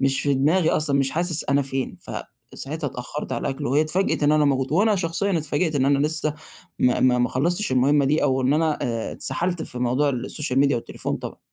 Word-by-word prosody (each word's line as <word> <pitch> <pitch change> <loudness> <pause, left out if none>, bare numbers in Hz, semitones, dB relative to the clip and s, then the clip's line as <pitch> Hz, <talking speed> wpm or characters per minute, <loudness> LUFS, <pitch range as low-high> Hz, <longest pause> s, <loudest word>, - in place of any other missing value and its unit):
مش 135 0 +2
في 145 -1 +1
دماغي 155 +6 +2
أصلًا، 145 -2 +1
مش 135 -1 +1
حاسس 170 -1 0
أنا 140 0 +2
فين، 135 -1 -4
فساعتها 150 +2 -7
اتأخّرت 125 +4 -6
على - - -2
الأكْل 140 +1 -4
وهي 140 +5 +2
اتفاجئت 165 +2 0
إن 145 +1 +4
أنا 155 -1 +3
موجود 135 -1 0
وأنا 210 +6 +3
شخصيًا 180 +2 0
اتفاجِئت 155 +1 -1
إن 130 - +2
أنا 140 0 +3
لسه 155 -1 -2 0.4
ما 125 - +2
ما 125 -1 +4
ما 125 - +2
خلّصتش 175 +7 0
المهمة 140 +3 +3
دي 150 +4 +1
أو 130 0 +1
إن 130 - +2
أنا، 155 -1 +1
آآ 115 -3 -2
اتسحَلت 175 -1 -2
في 125 - -6
موضوع 125 +4 +1
السوشيال 130 +1 -2
ميديا 140 -2 +3
والتليفون 115 - -4
طبعًا. - - -8
145 Hz, 210 wpm, -23 LUFS, 130-160 Hz, 0.4 s, إن